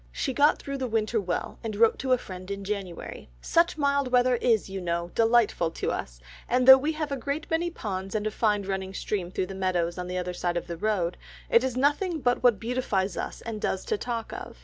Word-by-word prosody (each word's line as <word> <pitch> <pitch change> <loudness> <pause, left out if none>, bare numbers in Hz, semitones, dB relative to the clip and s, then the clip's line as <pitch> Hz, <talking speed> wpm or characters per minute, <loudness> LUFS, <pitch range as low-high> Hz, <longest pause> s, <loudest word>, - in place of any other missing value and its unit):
She 270 - -2
got 290 +3 +4
through 275 -1 -5
the 260 - -1
winter 225 -1 0
well, 180 -2 -3
and 220 -2 -3
wrote 225 +2 +4
to 260 -1 -2
a 255 - +6
friend 185 -4 -9
in 200 0 -4
January, 195 - -5
"Such 335 - +2
mild 280 -3 +1
weather 250 0 +4
is, 230 -3 +2
you 195 0 -5
know, 170 0 -2
delightful 225 -7 +3
to - - -2
us, - - -5 0.3
and 250 +1 +2
though 265 0 +11
we 300 +4 -1
have 305 -2 -3
a - - 0
great 280 +5 -3
many 335 +2 +1
ponds 195 - -5
and 210 0 -1
a 215 - 0
fine 210 -2 +1
running 190 0 -4
stream 190 -5 -2
through 185 - -2
the 195 - -8
meadows 180 -2 -1
on 180 - -4
the 180 0 -3
other 180 0 -3
side 175 0 -1
of 175 - -3
the 170 - -5
road, 180 -3 0 0.3
it 235 - +6
is 260 -1 -2
nothing 300 +6 +1
but 245 -2 +1
what 240 -5 +4
beautifies 220 -6 -1
us - - -5
and 225 -2 -6
does 190 - -1
to 440 - 0
talk 235 - -4
of. - - -8
220 Hz, 235 wpm, -27 LUFS, 190-255 Hz, 0.3 s, though